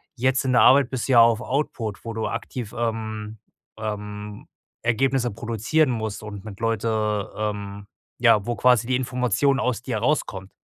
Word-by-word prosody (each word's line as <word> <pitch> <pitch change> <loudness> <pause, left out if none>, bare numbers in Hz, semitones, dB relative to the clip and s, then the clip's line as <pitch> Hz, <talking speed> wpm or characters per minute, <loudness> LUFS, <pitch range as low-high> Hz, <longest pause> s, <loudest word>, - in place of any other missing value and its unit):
jetzt 130 +2 +1
in 130 - +1
der 125 - +5
Arbeit 135 -1 +6
bist 130 -1 -3
du - - 0
ja 120 - +8
auf 115 0 +4
Output, 120 -7 -3
wo 115 - -5
du 110 0 -2
aktiv, 120 -5 -5
ähm, 110 -2 -3 0.4
ähm, 105 -1 -6 0.3
Ergebnisse 120 +1 +1
produzieren 120 +8 0
musst 110 -3 -4
und 105 -2 -8
mit 100 -1 -9
Leuten, 115 -1 -1 0.5
ähm 100 -1 -4 0.3
ja, 115 -4 +5
wo 120 - -1
quasi 125 -2 +3
die 130 - +1
Information 125 +2 +1
aus 125 -2 -1
dir 115 -5 -2
rauskommt. 105 -7 -1
115 Hz, 165 wpm, -24 LUFS, 105-125 Hz, 0.5 s, ja